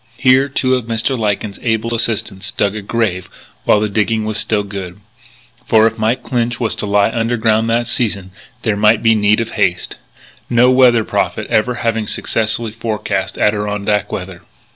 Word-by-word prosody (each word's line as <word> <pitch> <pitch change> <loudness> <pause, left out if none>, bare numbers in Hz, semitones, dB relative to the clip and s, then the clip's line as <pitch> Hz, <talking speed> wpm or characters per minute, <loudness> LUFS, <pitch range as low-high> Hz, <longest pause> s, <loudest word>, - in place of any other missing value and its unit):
Here 130 +1 +4
two 130 -1 0
of 125 -3 0
Mr. 115 +3 -1
Lyken's 105 -2 -2
able 115 0 -1
assistants 105 -4 -3
dug 100 +1 -1
a 105 - -4
grave 100 -4 -2 0.4
while 105 - +4
the 105 - 0
digging 110 +1 0
was 110 0 -2
still 105 -2 0
good; 100 -2 -7 0.6
for 110 -3 +4
if 115 0 0
Mike 110 +3 0
Clinch 120 -2 -1
was 115 -3 0
to 105 - -3
lie 100 +1 +2
underground 115 -1 +1
that 120 +1 +1
season 100 -6 -2 0.3
there 110 -3 +1
might 105 +2 +3
be 115 -1 +5
need 105 0 +2
of 115 0 -3
haste 90 0 -1 0.5
no 125 +1 +4
weather 125 -3 +5
prophet - - -2
ever 120 +3 +1
having 115 -2 -1
successfully 115 +2 -2
forecast 105 -4 -3
Adirondack 105 0 0
weather. 90 -1 -6
110 Hz, 165 wpm, -16 LUFS, 105-115 Hz, 0.6 s, be